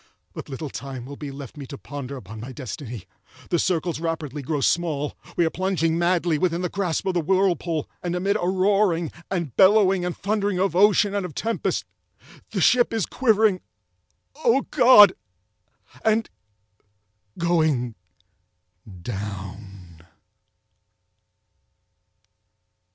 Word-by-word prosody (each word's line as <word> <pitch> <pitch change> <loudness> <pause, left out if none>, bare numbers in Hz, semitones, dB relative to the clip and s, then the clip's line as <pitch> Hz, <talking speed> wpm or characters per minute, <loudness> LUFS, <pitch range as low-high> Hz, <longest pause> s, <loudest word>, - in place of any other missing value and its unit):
But - - -8
little 140 +1 -6
time 130 -3 -7
will 140 +2 -8
be 145 0 -7
left 140 0 -9
me 140 -2 -8
to 140 - -8
ponder 140 -1 -7
upon 110 -2 -10
my 120 +4 -7
destiny! 125 - -7 0.5
The 175 - +2
circles 170 -3 0
rapidly 160 -4 -3
grow 145 +2 -2
small—we 160 +2 -1
are 160 - 0
plunging 180 -3 0
madly 170 -2 +1
within 175 0 0
the 180 - -1
grasp 180 -4 -2
of 190 - 0
the 175 - +1
whirlpool—and 175 -1 -1
amid 195 +3 0
a 175 - 0
roaring, 190 -3 +2 0.2
and 170 -9 -3
bellowing, 195 -2 +5
and 180 -1 -3
thundering 205 -1 -1
of 190 -3 0
ocean 205 +1 +4
and 200 -1 -1
of 180 -5 -7
tempest, 230 +1 -2 0.6
the - - -2
ship 245 -1 +4
is 225 -4 0
quivering—oh 185 - -1
God! 240 -8 +8 0.9
and—going 110 - -3 1.1
down. 95 -4 -7
165 Hz, 120 wpm, -24 LUFS, 130-190 Hz, 1.1 s, God